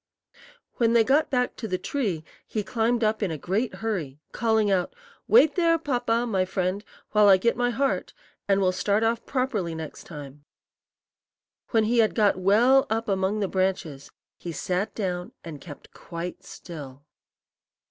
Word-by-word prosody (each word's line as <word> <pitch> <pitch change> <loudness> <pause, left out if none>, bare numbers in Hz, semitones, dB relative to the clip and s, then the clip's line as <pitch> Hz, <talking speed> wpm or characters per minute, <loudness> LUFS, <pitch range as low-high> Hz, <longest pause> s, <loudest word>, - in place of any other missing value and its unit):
When 230 -1 +3
they 230 -1 +5
got 275 +7 +2
back 250 -2 0
to 225 - -5
the 185 - -1
tree, 195 - -2 0.2
he 215 - -2
climbed 230 +2 0
up 215 +1 +1
in 200 - 0
a 160 - -4
great 205 - -2
hurry, 170 -11 -4
calling 220 -3 +1
out, 185 - 0 0.3
"Wait 380 - +6
there, 335 -2 +3
Papa, 245 -6 0
my 195 -6 +1
friend, 185 +2 -2 0.3
while 210 -1 +5
I 190 - +8
get 235 +5 +1
my 245 0 +1
heart, 270 +3 -1 0.3
and 195 -1 +3
we'll 185 -2 +3
start 200 +4 0
off 230 +1 0
properly 230 -11 -1
next 160 -2 -8
time." 145 -2 -10 1.3
When 225 -2 +3
he 235 +2 +2
had 220 -2 +3
got 210 -3 +3
well 225 +9 +4
up 225 +1 -1
among 195 +1 0
the 200 - +1
branches, 185 -7 -2 0.3
he 175 - -6
sat 180 +5 -2
down 180 -4 -3
and 155 -4 -8
kept 145 -3 -12
quite 170 +1 -7
still. 145 -5 -10
205 Hz, 165 wpm, -25 LUFS, 180-235 Hz, 1.3 s, I